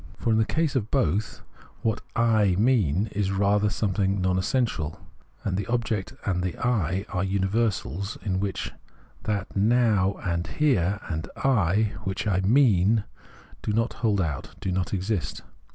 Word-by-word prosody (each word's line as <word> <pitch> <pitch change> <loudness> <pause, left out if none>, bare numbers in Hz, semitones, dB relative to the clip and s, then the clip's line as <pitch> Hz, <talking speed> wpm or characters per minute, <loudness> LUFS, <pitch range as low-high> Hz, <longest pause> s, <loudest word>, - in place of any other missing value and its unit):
For, 115 - 0
in 110 - +3
the 110 - +3
case 155 +3 0
of 115 -4 0
both, 110 -6 0 0.4
what 110 -2 0
I 110 -5 +3
"mean" 105 - +3
is 100 -1 -1
rather 100 +1 +2
something 100 -1 0
non 90 0 +1
essential; 95 - -1 0.4
and 95 - -1
the 100 - -3
object 115 -5 -1
and 90 -2 0
the 90 -1 -3
I 100 -5 0
are 90 -1 -1
universals, 100 - -1
in 95 -3 -1
which 100 -1 -3 0.5
that 100 -3 -2
Now 105 -2 +3
and 85 -2 -1
Here 100 - +1
and 80 -1 -3
I, 105 -5 +2
which 95 0 -3
I 100 -3 +2
"mean," 105 -1 +4 0.6
do 105 - -2
not 115 +3 +1
hold 105 -4 +1
out, 80 -6 -3
do 95 - -2
not 90 0 -1
exist. 95 -7 -2
100 Hz, 150 wpm, -26 LUFS, 95-110 Hz, 0.6 s, mean